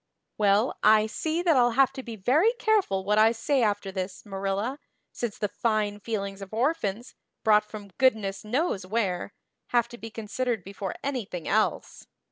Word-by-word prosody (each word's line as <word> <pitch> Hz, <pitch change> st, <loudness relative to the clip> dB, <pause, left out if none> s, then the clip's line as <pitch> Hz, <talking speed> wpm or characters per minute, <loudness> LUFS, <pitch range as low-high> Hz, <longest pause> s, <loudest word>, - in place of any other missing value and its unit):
"Well, 210 Hz, +3 st, +2 dB
I 215 Hz, 0 st, +6 dB
see 315 Hz, +10 st, -2 dB
that 335 Hz, -4 st, +4 dB
I'll 245 Hz, -2 st, +4 dB
have 270 Hz, -1 st, +5 dB
to 265 Hz, -, -6 dB
be 235 Hz, -3 st, -7 dB
very 290 Hz, -, +3 dB
careful 410 Hz, -, +1 dB
what 210 Hz, +1 st, +3 dB
I 220 Hz, +1 st, +6 dB
say 250 Hz, +4 st, 0 dB
after 205 Hz, -3 st, 0 dB
this, 185 Hz, +1 st, -5 dB
Marilla, 200 Hz, +6 st, -2 dB, 0.3 s
since 235 Hz, -4 st, -4 dB
the 210 Hz, -, -1 dB
fine 210 Hz, -1 st, -1 dB
feelings 200 Hz, -3 st, -4 dB
of 195 Hz, +2 st, -8 dB
orphans, 240 Hz, -4 st, -1 dB, 0.3 s
brought 210 Hz, -1 st, +5 dB
from 205 Hz, -2 st, -9 dB
goodness 215 Hz, -7 st, +2 dB
knows 240 Hz, -, -1 dB
where, 190 Hz, -2 st, -1 dB, 0.4 s
have 240 Hz, -1 st, +2 dB
to 240 Hz, -, -11 dB
be 225 Hz, +3 st, -7 dB
considered 225 Hz, 0 st, -3 dB
before 195 Hz, 0 st, -6 dB
anything 225 Hz, -, -4 dB
else. 215 Hz, +2 st, 0 dB
215 Hz, 165 wpm, -27 LUFS, 200-250 Hz, 0.4 s, I